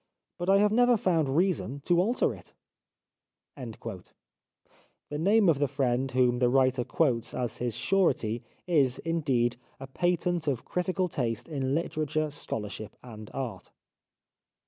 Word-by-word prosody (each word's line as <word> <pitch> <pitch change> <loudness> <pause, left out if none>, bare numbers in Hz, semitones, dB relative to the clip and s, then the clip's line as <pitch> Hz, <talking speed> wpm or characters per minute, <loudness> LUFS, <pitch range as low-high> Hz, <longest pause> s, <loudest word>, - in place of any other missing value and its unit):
But 175 +2 -2
I 195 - +6
have 205 +1 +3
never 245 +1 +4
found 165 -8 +1
reason 165 - 0
to 175 +4 +3
alter 230 +7 +1
it." - - -15 1.0
The 115 -8 -9 0.8
name 195 +8 +3
of 155 -5 +3
the 145 - +2
friend 130 -1 0
whom 125 -1 +2
the 125 -1 +3
writer 130 -1 +3
quotes 125 -5 0
as 120 -3 -3
his 120 -2 -2
surety 120 - +1 0.2
is, 145 -8 +2
indeed, 135 -8 0 0.2
a 135 - -7
patent 175 +3 0
of 135 -5 -1
critical 185 +1 -1
taste 120 -9 -2
in 135 -4 -1
literature, 155 -2 -1
scholarship 105 -6 -5
and 110 -3 -10
art. 130 -4 -5
140 Hz, 135 wpm, -28 LUFS, 125-175 Hz, 1.0 s, I